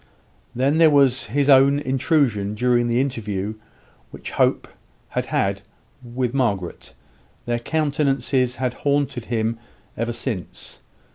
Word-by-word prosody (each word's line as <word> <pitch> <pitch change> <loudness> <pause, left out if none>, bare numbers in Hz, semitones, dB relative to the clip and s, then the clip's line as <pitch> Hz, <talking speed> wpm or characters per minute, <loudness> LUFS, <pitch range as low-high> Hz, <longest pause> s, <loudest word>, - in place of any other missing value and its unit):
Then 140 +6 +1
there 165 -1 +7
was 135 -3 +3
his 140 +5 0
own 140 0 +6
intrusion 130 -6 0
during 120 +1 +2
the 120 +1 +1
interview 110 -6 -2 0.6
which - - -9
Hope - - +1 0.4
had - - -1 0.4
with 120 0 -3
Margaret; 100 -10 -2 0.5
their 120 0 -1
countenances 140 -3 0
had 125 -1 -2
haunted 140 -5 -1
him 115 -1 -1 0.4
ever 115 +1 -2
since. 115 -6 -6
125 Hz, 115 wpm, -22 LUFS, 115-140 Hz, 0.6 s, there